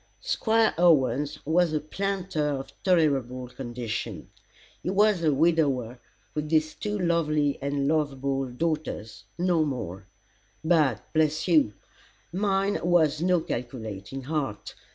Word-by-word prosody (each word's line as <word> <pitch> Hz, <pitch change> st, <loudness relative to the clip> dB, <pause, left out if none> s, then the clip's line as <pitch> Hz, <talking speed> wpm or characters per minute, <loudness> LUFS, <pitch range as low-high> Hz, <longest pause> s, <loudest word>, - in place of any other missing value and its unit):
Squire 225 Hz, -, +2 dB
Owens 145 Hz, -3 st, +3 dB
was 165 Hz, +1 st, +2 dB
a 155 Hz, -, +1 dB
planter 190 Hz, 0 st, -2 dB
of 140 Hz, -2 st, -3 dB
tolerable 135 Hz, -8 st, +1 dB
condition. 120 Hz, -3 st, -5 dB, 0.5 s
He -, -, -3 dB
was 200 Hz, -2 st, +3 dB
a 155 Hz, -, +4 dB
widower, 140 Hz, -6 st, +1 dB, 0.3 s
with 150 Hz, 0 st, -3 dB
these 155 Hz, -1 st, +2 dB
two 210 Hz, 0 st, -3 dB
lovely 155 Hz, -5 st, +1 dB
and 140 Hz, 0 st, -1 dB
lovable 140 Hz, -3 st, 0 dB
daughters 150 Hz, -4 st, -3 dB
no 175 Hz, -2 st, +2 dB
more. 95 Hz, -, -4 dB, 0.6 s
But, 155 Hz, -, +2 dB
bless 155 Hz, 0 st, +1 dB
you! 155 Hz, -, +4 dB, 0.6 s
Mine 195 Hz, +1 st, +1 dB
was 160 Hz, -3 st, +3 dB
no 180 Hz, -1 st, +3 dB
calculating 120 Hz, -2 st, -5 dB
heart. 135 Hz, -8 st, -3 dB
150 Hz, 115 wpm, -27 LUFS, 135-170 Hz, 0.6 s, a